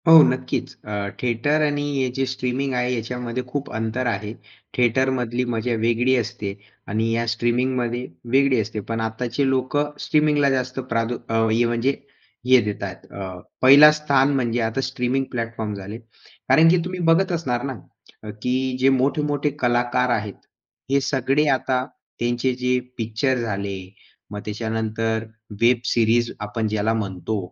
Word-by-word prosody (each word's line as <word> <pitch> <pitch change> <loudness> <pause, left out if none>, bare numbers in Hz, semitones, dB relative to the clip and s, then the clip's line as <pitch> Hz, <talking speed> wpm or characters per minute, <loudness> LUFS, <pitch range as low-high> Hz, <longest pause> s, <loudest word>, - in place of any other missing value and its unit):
हो, 165 -1 +10
नक्कीच. 130 0 -2
अ, 105 - -5 0.3
थिएटर 125 +6 +1
आणि 145 -1 +1 0.2
हे 130 -1 +1
जे 135 +1 -1
स्ट्रीमिंग 130 +1 -2
आहे, 125 0 0
याच्यामध्ये 125 +1 -4
खूप 140 +2 -4
अंतर 115 +3 -2
आहे. 105 -1 -2 0.4
थिएटरमधली 125 0 +1
मजा 115 +2 -1
वेगळी 120 +3 +2
असते 105 -3 -3 0.3
आणि 110 +2 0
या 115 +1 0
स्ट्रीमिंगमध्ये 120 +1 -1 0.3
वेगळी 135 -2 +4
असते. 110 +1 -5
पण 115 +2 -4
आत्ताचे 120 +4 -1
लोक 130 +1 0 0.2
स्ट्रीमिंगला 150 -2 +3
जास्त 130 -1 -1
प्राद 115 +1 0 0.2
अ, - - -2 0.2
हे 115 +2 +3
म्हणजे 120 +4 +1 0.5
हे 130 -1 +6
देत 105 -1 -4
आहेत, - - -7
अ, 95 -2 -7 0.2
पहला 140 +4 +9
स्थान 145 -2 +2
म्हणजे 120 -2 0
आता 115 +4 -2
स्ट्रीमिंग 135 0 -1
प्लॅटफॉर्म 115 -3 -3
झाले. 100 +2 -7
कारण 130 +6 +1
की 180 - +5
तुम्ही 180 0 -5
बघत 190 +2 +1
असणार 130 -8 -1
ना, 135 -1 -3 0.5
अ, 105 - -7
की 130 +1 0
जे 130 +1 +5
मोठे-मोठे 145 +2 +1
कलाकार 120 +1 +1
आहेत, 105 -1 -6 0.6
हे 140 0 +3
सगळे 135 +2 +1
आता 130 -1 +1 0.3
त्यांचे 120 +2 0
जे 125 0 +1 0.2
पिक्चर 115 +3 0
झाले, 100 -4 -3 0.5
मग 105 - -5
त्याच्यानंतर 110 +1 -2 0.4
वेब 120 +1 +5
सिरीज 120 0 +2
आपण 105 +1 -2
ज्याला 110 +1 0
म्हणतो, 105 -1 -3
125 Hz, 150 wpm, -22 LUFS, 115-130 Hz, 0.6 s, हो